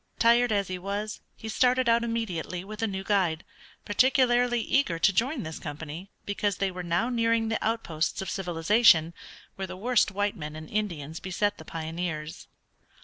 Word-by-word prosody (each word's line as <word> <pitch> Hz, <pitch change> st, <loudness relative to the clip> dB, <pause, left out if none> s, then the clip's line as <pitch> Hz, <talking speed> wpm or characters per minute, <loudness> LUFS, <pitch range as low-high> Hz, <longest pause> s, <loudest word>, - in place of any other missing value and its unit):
Tired 235 Hz, +1 st, +4 dB
as 200 Hz, -2 st, +1 dB
he 185 Hz, -1 st, -4 dB
was, 205 Hz, +3 st, -4 dB
he 220 Hz, -, -9 dB
started 250 Hz, +3 st, +2 dB
out 235 Hz, 0 st, +4 dB
immediately 185 Hz, -7 st, -3 dB
with 210 Hz, +2 st, -8 dB
a 225 Hz, -, +1 dB
new 190 Hz, -2 st, -4 dB
guide, 185 Hz, -5 st, +1 dB, 0.4 s
particularly 245 Hz, +1 st, +3 dB
eager 230 Hz, -7 st, +1 dB
to 195 Hz, +4 st, +3 dB
join 250 Hz, -, 0 dB
this 160 Hz, 0 st, -6 dB
company, 160 Hz, +5 st, -7 dB, 0.2 s
because 205 Hz, -1 st, -1 dB
they 195 Hz, -1 st, 0 dB
were 180 Hz, 0 st, -6 dB
now 175 Hz, +7 st, 0 dB
nearing 230 Hz, -2 st, +1 dB
the 225 Hz, -, -1 dB
outposts 170 Hz, -8 st, -1 dB
of 190 Hz, -, -4 dB
civilization, 175 Hz, -1 st, +3 dB, 0.4 s
where 190 Hz, 0 st, -3 dB
the 185 Hz, 0 st, -8 dB
worst 240 Hz, +3 st, +2 dB
white 205 Hz, +1 st, -1 dB
men 150 Hz, -4 st, -7 dB
and 155 Hz, 0 st, -9 dB
Indians 165 Hz, -8 st, -3 dB
beset 200 Hz, +3 st, -1 dB
the 160 Hz, -, -10 dB
pioneers. 160 Hz, -1 st, -5 dB
200 Hz, 170 wpm, -27 LUFS, 170-230 Hz, 0.4 s, Tired